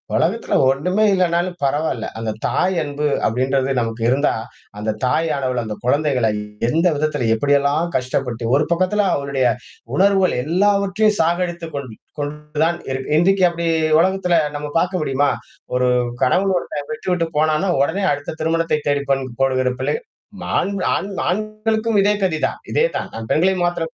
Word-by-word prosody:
உலகத்துல - - 0
ஒன்னுமே 180 +10 +1
இல்லனாலும் 175 -1 +1
பரவால்ல. 140 -4 0
அந்தத் 110 -1 -4
தாய் 185 +1 +1
அன்பு 145 0 -3 0.2
அப்பிடின்றது 130 +3 +1
நமக்கு 115 0 -3
இருந்தா, 140 +3 +2 0.4
அந்தத் 105 0 -3
தாய் 145 +6 +2
ஆனவள் 130 -3 -1
அந்த 110 -1 -5
குழந்தைகளை 130 -3 +2 0.4
எந்த 165 +8 +2
விதத்தில 145 -5 -1
எப்பிடி 145 +5 +1
எல்லாம் 145 +4 +1
கஷ்டப்பட்டு 125 -2 -2
ஒரு 150 - +3
பக்கத்துல 185 +4 +2
அவளுடைய 140 -2 -1 0.5
உணர்வுகள் 195 +2 +3
எல்லாவற்றையும் 200 +5 +2
சாகடித்துக் 170 -1 -1
கொண்டு 130 -6 -6 0.2
கொண்டுதான் 150 +3 -2
இருக்கு 130 +2 -3
இன்றைக்கு 190 +3 +3
அப்பிடி 170 0 -3 0.3
உலகத்துல 185 0 +2 0.2
நம்ம 150 0 -4
பார்க்க 180 0 -1
முடியுமா? 140 0 +1 0.5
ஒரு 125 0 +2 0.4
கணவன் 190 +9 +2
ஒருத்தன் 145 -4 -5
விட்டு-விட்டுப் 180 -7 -2
போனானா 155 +5 +2
உடனே 180 +8 0
அடுத்த 145 +2 -3
திருமணத்தைத் 160 -1 0
தேடிப் 140 -1 0
பெண் 135 -1 +1 0.2
போகிற 130 -1 +2
பிள்ளை 145 +3 0 0.6
ஆண்-ஆண் 195 0 -1
ஆண் 200 - -3 0.2
ஆண்களுக்கும் 215 +2 0
இதே 205 +1 +3
கதிதான். 160 -5 0
இதே 470 - +3
தான். - - -5
நான் 115 0 -7
பெண்களை 185 +4 +3
மாத்திரம் 165 -2 -2
155 Hz, 145 wpm, -20 LUFS, 135-185 Hz, 0.6 s, ஒரு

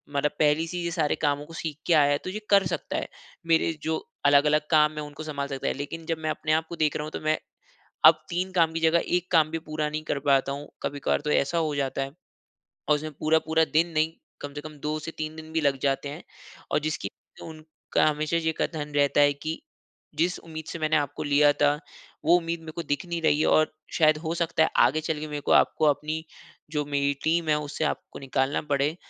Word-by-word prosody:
मतलब 140 +1 +1
पहली 150 +2 +3
से 180 - -5
ही 175 - -3
ये 170 - -2
सारे 160 -3 +1
कामों 145 -1 0
को 165 - -13
सीख 160 -3 -5
के 175 - +4
आया 145 -2 +5
है, 145 - +3
तो 170 - -7
ये 205 +3 -4
कर 200 -1 +5
सकता 170 -2 -3
है। - - -3 0.4
मेरे 165 0 +3
जो 160 0 0 0.3
अलग-अलग 150 +2 +4
काम 150 -1 +5
है, - - -2
उनको 145 +1 -8
सँभाल 145 -2 -3
सकता 135 -1 -4
है। - - +1
लेकिन 160 +4 -6
जब 165 0 -1
मैं 155 - 0
अपने 155 0 -2
आप 160 +1 +1
को 170 - -5
देख 155 -3 +1
रहा 150 - -3
हूँ, 155 - -7
तो - - -5
मैं, 155 0 +1 0.7
अब 155 0 +7
3 180 +2 -2
काम 165 -2 +3
की 165 - -1
जगह 165 +1 +3
1 180 0 -6
काम 160 -3 +4
भी 165 - -2
पूरा 155 -1 -3
नहीं 155 +1 -4
कर 145 - -2
पाता 135 0 +3
हूँ। 145 +1 -6
कभी-कभार 140 0 -1
तो - - 0
ऐसा 140 +5 +1
हो 155 -3 0
जाता 135 -1 -1
है, 135 0 -3 0.8
और 150 - +6
उसमें 155 +1 -4
पूरा-पूरा 160 +1 +2
दिन 165 +3 +3
नहीं 155 +1 +1 0.3
कम 145 0 -6
से 145 - -6
कम 155 0 -10
2-3 155 0 -4
दिन 160 0 -10
भी 160 - +1
लग 140 -2 +1
जाते 140 0 0
हैं। 150 +4 -8 0.5
और - - +3
जिसकी 155 +1 -3 0.3
उनका 155 -1 -2
हमेशा 155 +2 -1
ये 160 -1 0
कथन 150 -2 -3
रहता 145 0 +4
है 145 0 +5
कि, 155 - -5 0.5
"जिस 170 +4 0
उम्मीद 160 -1 -8
से 170 - -6
मैंने 155 0 +1
आपको 145 -1 -2
लिया 145 0 +5
था, 145 0 +2 0.5
वो 170 +3 +6
उम्मीद 170 0 -3
मेरे 160 -1 -8
को 170 +2 -5
दिख 145 0 -2
नहीं 170 -1 -3
रही 150 -2 +3
है - - +2
और 155 0 +3 0.2
शायद 155 -2 +4
हो 160 0 -3
सकता 170 -1 +1
है, - - +2
आगे 135 +6 +4
चलके 155 -1 -3
मेरे 145 -1 -4
को - - -2
आपको, 155 - +4
अपनी 155 +2 0 0.5
जो 150 -1 0
मेरी 140 0 +1
टीम 165 0 +1
है, 150 - +4
उससे 150 +1 -4
आपको - - -4
निकालना 135 +1 0
पड़े, 140 +3 +1
155 Hz, 235 wpm, -26 LUFS, 145-160 Hz, 0.8 s, अब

